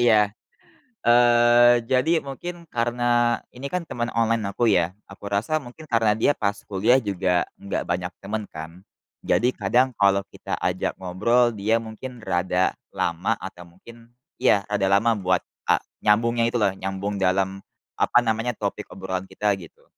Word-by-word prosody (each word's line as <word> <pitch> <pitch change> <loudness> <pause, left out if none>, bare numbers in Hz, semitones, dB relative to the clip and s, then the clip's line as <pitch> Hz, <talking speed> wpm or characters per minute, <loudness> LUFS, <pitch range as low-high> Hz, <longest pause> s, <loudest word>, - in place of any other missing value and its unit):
iya. 115 -3 +5 0.9
Eee, 120 0 +6
jadi 135 +7 +2
mungkin 170 +5 -7
karena 120 0 +1 0.2
ini 135 +3 -6
kan 180 -2 -2
teman 120 -5 -3
online 115 -1 +1
aku 120 +4 0
ya, 90 -1 +2
aku 100 +1 -9
rasa 115 +10 0
mungkin 130 +5 -12
karena 115 -5 +2
dia 145 - +3
pas 100 -1 -1
kuliah 105 +6 +3
juga 95 -5 0 0.2
enggak 100 - -3
banyak 90 +1 -2
temen 105 +2 -3
kan, 80 +3 -9 0.4
jadi 125 +2 +2
kadang 125 +6 +2
kalau 100 0 +4
kita - - -4
ajak 90 0 -1
ngobrol 115 +7 +2
dia 105 +3 +1
mungkin 115 +2 -9
rada 90 0 +1 0.2
lama 90 +6 0
atau 90 -2 -9
mungkin 115 +7 -16 0.3
ya 100 -2 +3
rada 100 -2 0
lama 100 +4 +3
buat 90 -2 0 0.2
a - - +5 0.2
nyambungnya 115 +2 +3
itu 120 - -2
loh, 100 -4 +2
nyambung 95 +1 -4
dalam, 95 +1 +1 0.4
apa - - +4
namanya, 115 +1 0
topik 100 -2 -4
obrolan 95 0 -5
kita 105 0 0
gitu. 85 - -15
110 Hz, 155 wpm, -24 LUFS, 95-120 Hz, 0.9 s, Eee